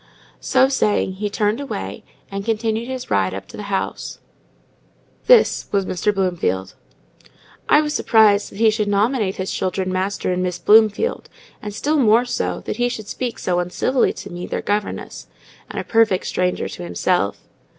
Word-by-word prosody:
so 260 0 +3
saying, 210 -7 +1
he 205 +2 -3
turned 210 +3 0
away, 95 - -5 0.3
and 195 0 -4
continued 225 +1 -1
his 260 -1 -6
ride 95 -2 +1
up 95 - -7
to - - -12
the 205 -1 -7
house. 195 - -3 1.1
This - - +5
was 200 -2 +1
Mr. 185 +4 0
Bloomfield. 175 - -1 1.0
I 300 - +6
was 300 -1 -2
surprised 215 -5 +4
that - - -13
he 220 0 +4
should 215 -1 -1
nominate 205 0 +1
his 190 0 -4
children 185 0 -2
Master 185 0 -1
and 180 - -1
Miss 180 -1 -2
Bloomfield; 220 - +3 0.3
and 210 - -5
still 290 +9 0
more 230 0 +4
so, 245 - -2
that - - -5
he 245 0 +1
should 215 -4 -6
speak 245 -2 -4
so 180 -1 0
uncivilly 185 +9 +1
to - - -9
me, 175 +1 -6
their - - -3
governess, 205 0 -3 0.4
and - - -5
a - - -3
perfect 225 -5 +2
stranger 180 0 -1
to - - -8
himself. 175 - -1
205 Hz, 170 wpm, -20 LUFS, 185-230 Hz, 1.1 s, I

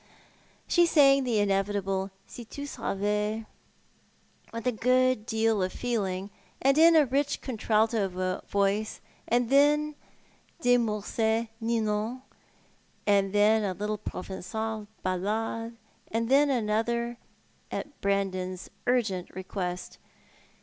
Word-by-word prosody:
She 345 -1 +4
sang 275 -4 +5
the 235 -3 +1
inevitable 195 -1 0
" - - -37
Si 240 - -9
tu 285 +5 -8
savais 210 -2 -2 0.5
" - - -33
with 230 +1 -6
a 250 - +3
good 255 -1 +2
deal 220 -2 +1
of 185 0 0
feeling, 200 -5 -2 0.3
and 275 +1 +3
in 330 +2 +7
a 305 -2 +6
rich 275 +3 0
contralto 215 -6 0
voice; 200 +2 0 0.3
and 240 +1 +1
then 295 +2 +4 0.7
De 245 -5 +4
Mussct's 220 +1 0
" 225 - -35
Ninon," 225 +2 -1 0.8
and 200 -2 +3
then 210 +2 +4
a 195 -2 -1
little 210 +2 -3
Proven(;al 215 +3 -5 0.2
ballad, 220 +5 -2 0.3
and 230 +1 -1
then 285 +2 +5
another, 235 0 0 0.5
at 290 - -6
Brandon's 185 -2 -1 0.2
urgent 215 -8 +1
request. 185 -1 -5
220 Hz, 115 wpm, -28 LUFS, 200-245 Hz, 0.8 s, in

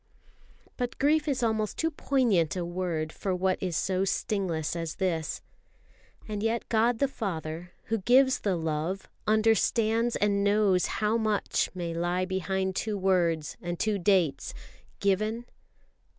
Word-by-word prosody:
But 245 -1 -3
grief 305 +2 +2
is 265 -4 0
almost 220 -2 0
too 325 0 0
poignant 240 - +1
a 180 -2 -2
word 170 -3 -2
for 190 -2 -2
what 185 +1 0
is 180 -4 -1
so 190 0 0
stingless 180 -5 -1
as 165 -2 -4
this. 165 -5 -2 0.8
And 210 -1 -3
yet 225 +1 -1
God 230 +1 +3
the 280 - +2
Father, 175 -7 -5
who 225 0 -1
gives 255 +5 +4
the 195 -3 0
love, 165 +3 -2 0.2
understands 225 +1 +2
and 200 -1 +1
knows 200 -3 +3
how 215 +1 0
much 215 -2 0
may 170 -2 -3
lie 175 +2 0
behind 190 0 -1
two 215 +1 -1
words 175 -5 +1
and 175 0 -4
two 215 -2 +1
dates. 180 -6 +1 0.4
"Given 215 +4 0
195 Hz, 140 wpm, -28 LUFS, 175-220 Hz, 0.8 s, gives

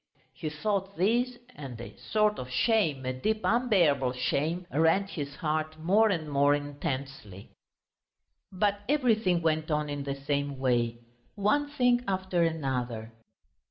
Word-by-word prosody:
He 155 - -4
thought 195 +5 -2
this, 240 +7 +1 0.2
and 130 - -8
a 120 - -9
sort 215 -1 +1
of 125 - -6
shame, 155 - +1
a 130 - -1
deep 215 +12 -1
unbearable 175 - +3
shame, 160 +7 -1
rent 165 +6 +2
his 145 -2 -5
heart 155 0 -2
more 200 +8 +3
and 165 -6 -1
more 145 0 +3
intensely. 135 -8 -5 1.0
But 200 +2 +1
everything 220 - +2
went 155 0 +1
on 150 -1 0
in 145 -1 -3
the 140 0 -3
same 140 0 -2
way, 120 -3 0 0.3
one 285 +9 +1
thing 245 -4 +2
after 190 -2 0
another. 125 -8 -2
155 Hz, 135 wpm, -29 LUFS, 140-205 Hz, 1.0 s, unbearable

